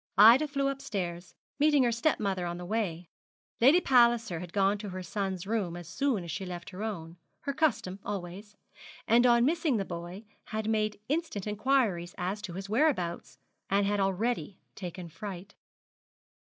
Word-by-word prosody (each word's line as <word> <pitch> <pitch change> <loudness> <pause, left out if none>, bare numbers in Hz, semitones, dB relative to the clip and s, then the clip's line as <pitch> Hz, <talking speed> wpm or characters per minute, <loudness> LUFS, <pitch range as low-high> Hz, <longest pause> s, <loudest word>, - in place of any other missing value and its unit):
Ida 235 +9 +8
flew 280 -1 0
upstairs, 195 -11 -4 0.2
meeting 295 -2 +5
her 240 - +2
step 235 +7 +1
mother 190 -4 -1
on 175 0 -4
the 175 - -7
way. 180 -5 -2 0.5
Lady 275 +9 +7
Palliser 235 - +3
had 175 0 -8
gone 200 +1 +2
to 210 -1 -6
her 185 0 -6
son's 190 -1 -3
room 195 -5 -1
as 175 -2 -9
soon 240 +1 0
as 170 - -6
she 190 - -4
left 175 -1 -7
her 185 +2 -8
own 175 -6 -5 0.2
her 280 - -3
custom 270 -11 0
always; 200 +1 -6 0.5
and 240 +3 +5
on 235 0 +5
missing 315 -4 +1
the 195 - -1
boy, 175 +4 -7 0.2
had 215 -1 -3
made 215 -1 0
instant 295 - -2
inquiries 210 -5 0
as 190 +3 -2
to 180 - -6
his 190 +2 -6
whereabouts, 215 - 0 0.3
and 200 +1 +3
had 205 0 +1
already 195 +2 -1
taken 180 -1 -7
fright. 195 +3 -8
205 Hz, 170 wpm, -30 LUFS, 180-235 Hz, 0.5 s, Ida